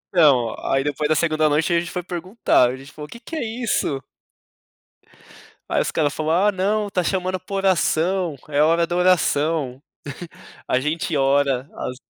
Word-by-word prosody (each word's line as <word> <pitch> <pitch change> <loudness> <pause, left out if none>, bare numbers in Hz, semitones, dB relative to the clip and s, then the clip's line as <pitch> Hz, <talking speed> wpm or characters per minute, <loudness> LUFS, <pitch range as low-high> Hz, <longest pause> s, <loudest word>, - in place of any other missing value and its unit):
Então, 135 -9 +4 0.2
aí 135 0 +2
depois 145 +1 -1
da 155 - +3
segunda 155 -1 +2
noite 150 +3 +1
a 170 - +4
gente 175 +1 -5
foi 180 - -4
perguntar, 180 - +1
a 125 - -4
gente 135 +2 -13
falou: 150 -1 -9
"Que 235 - -10
que 325 - -8
é 315 - -2
isso?" 225 - -2 1.7
Aí - - +2
os - - -2
cara 150 -2 +1
falou: 155 +2 -2
"Ah, 195 +5 +3
não, 205 +2 0
tá 180 -2 0
chamando 185 0 -1
pra 185 +2 -7
oração, 185 -2 +1
é 145 0 +2
hora 165 +2 +3
da 175 - -3
oração. 155 -6 +1 0.9
A 130 - +1
gente 155 +3 -2
ora 135 -1 +2
às 125 - -5
160 Hz, 175 wpm, -22 LUFS, 145-185 Hz, 1.7 s, Então